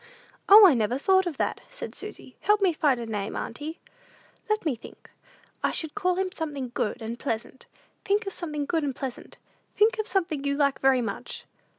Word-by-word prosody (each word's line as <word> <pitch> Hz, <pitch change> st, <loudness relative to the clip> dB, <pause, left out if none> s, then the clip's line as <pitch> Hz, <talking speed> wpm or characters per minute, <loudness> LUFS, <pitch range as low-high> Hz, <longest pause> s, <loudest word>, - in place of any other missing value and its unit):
"O, 415 Hz, +1 st, +11 dB
I 355 Hz, -, +8 dB
never 235 Hz, +1 st, +1 dB
thought 375 Hz, +5 st, +3 dB
of 315 Hz, -5 st, -4 dB
that," -, -, -1 dB
said -, -, -7 dB
Susy; -, -, -8 dB
"help 420 Hz, 0 st, +3 dB
me 380 Hz, -4 st, +3 dB
find 285 Hz, -5 st, +2 dB
a 235 Hz, -, -4 dB
name, 210 Hz, -2 st, -4 dB
auntie." 300 Hz, +7 st, -5 dB, 0.7 s
"Let 430 Hz, -3 st, 0 dB
me 295 Hz, -6 st, +1 dB
think. 230 Hz, -, -14 dB, 0.5 s
I -, -, +3 dB
should 315 Hz, -2 st, -2 dB
call 365 Hz, -3 st, +1 dB
him 375 Hz, 0 st, -1 dB
something 290 Hz, -8 st, -4 dB
good 230 Hz, +1 st, -2 dB
and 230 Hz, +2 st, -5 dB
pleasant. 230 Hz, +3 st, -4 dB, 0.4 s
Think 410 Hz, +2 st, +1 dB
of 390 Hz, -, -3 dB
something 300 Hz, -4 st, -3 dB
good 320 Hz, +1 st, 0 dB
and 275 Hz, -3 st, -2 dB
pleasant 265 Hz, -3 st, -7 dB, 0.4 s
Think 440 Hz, +2 st, +3 dB
of 435 Hz, -, -1 dB
something 335 Hz, -7 st, -1 dB
you 280 Hz, 0 st, 0 dB
like 280 Hz, -1 st, +1 dB
very 265 Hz, -1 st, +4 dB
much." -, -, -5 dB
300 Hz, 195 wpm, -26 LUFS, 260-380 Hz, 0.7 s, O